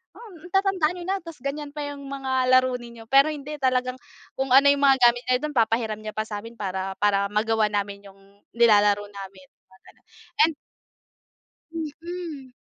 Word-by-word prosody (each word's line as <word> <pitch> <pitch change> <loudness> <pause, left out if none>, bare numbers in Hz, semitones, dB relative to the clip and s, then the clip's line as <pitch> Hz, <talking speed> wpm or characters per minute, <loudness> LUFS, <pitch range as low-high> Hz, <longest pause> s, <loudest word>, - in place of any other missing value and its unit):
"Hmm, 360 -7 -13
tatanda 385 -5 +2
niyo 350 - -7
na 390 +1 0
tapos 330 -6 -11
ganyan 285 +1 -4
pa 295 - -4
yung 285 -1 -8
mga 265 -2 -1
laro 255 0 +4
ninyo." 235 -1 -11
Pero 275 +2 +6
hindi 300 0 -6
talagang 255 -1 0 0.4
kung 265 -1 -1
ano 280 +1 +7
yung 285 0 0
mga 270 -1 +5
gamit 245 +1 -4
niya 250 +1 +2
dun 300 - -2
papahiram 225 -1 +1
niya 215 0 -7
pa 215 - -1
sa'min 225 +2 -7
para, 190 -1 -4
para 200 -1 +2
magawa 215 +1 +1
namin 200 0 -3
yung 195 0 -17 0.4
nilalaro 205 -3 +4
namin 195 -2 -11 0.2
mga 190 - -22
gano'n - - -21 0.4
and 325 - -3 1.2
Mm. 320 -3 -7
255 Hz, 170 wpm, -24 LUFS, 210-290 Hz, 1.2 s, ano